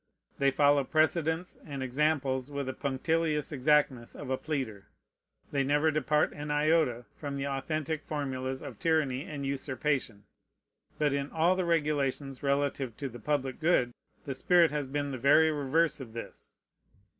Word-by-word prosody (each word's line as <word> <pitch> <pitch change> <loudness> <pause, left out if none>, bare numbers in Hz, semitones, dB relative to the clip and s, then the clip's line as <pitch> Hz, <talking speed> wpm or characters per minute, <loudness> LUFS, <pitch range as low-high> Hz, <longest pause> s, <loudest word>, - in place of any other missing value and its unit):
They 140 0 +4
follow 145 +1 +4
precedents 160 +4 +1
and 140 -3 -5
examples 135 -1 0
with 140 -1 -3
the 130 - -3
punctilious 150 +3 0
exactness 140 -3 +2
of 130 - -6
a - - +3
pleader. 130 -11 -4 0.6
They 140 -1 +1
never 145 +3 +2
depart 150 0 +1
an 150 +1 -6
iota 150 -5 +2
from 140 -2 -5
the 140 - -2
authentic 150 +2 -2
formulas 130 -3 -3
of - - -8
tyranny 155 -5 +1
and 145 -2 -5
usurpation. 135 -5 -2 0.7
But 150 -2 +2
in 140 0 -1
all 170 +3 +2
the 185 -1 -1
regulations 145 -4 0
relative 140 -3 0
to 140 -2 -4
the 120 0 -10
public 135 0 -1
good 155 -7 +3 0.3
the 140 - -3
spirit 170 +5 +4
has 145 -2 -2
been 145 +1 -2
the 130 - -5
very 150 +5 +5
reverse 150 +2 +1
of 120 -5 -9
this. 115 - -9
145 Hz, 155 wpm, -30 LUFS, 130-155 Hz, 0.7 s, very